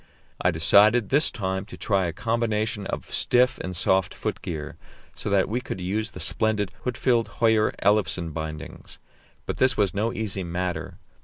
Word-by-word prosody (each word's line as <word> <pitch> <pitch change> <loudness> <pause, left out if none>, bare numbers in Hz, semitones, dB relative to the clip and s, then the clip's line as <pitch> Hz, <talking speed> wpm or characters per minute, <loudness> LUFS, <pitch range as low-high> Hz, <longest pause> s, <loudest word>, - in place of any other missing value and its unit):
I 90 - +3
decided 100 +7 +4
this 145 +3 +4
time 95 -4 -3
to - - -10
try 95 -4 +1
a - - -2
combination 110 +1 -1
of - - -6
stiff 125 0 +3
and 95 0 -5
soft 95 +1 +1
foot - - -4
gear, 75 -3 -5 0.4
so - - -5
that 100 -1 +2
we 120 +4 -2
could 95 - -6
use 105 +5 -2
the - - -10
splendid 105 -3 +1
Huitfeldt 125 -2 +1
Höyer 110 -2 +3
Ellefsen 95 -5 +2
bindings; 80 -2 -7 0.5
but - - -4
this 130 -2 +3
was 100 -2 +2
no 110 +3 0
easy 100 -4 -3
matter. 90 0 -4
105 Hz, 165 wpm, -25 LUFS, 90-110 Hz, 0.5 s, decided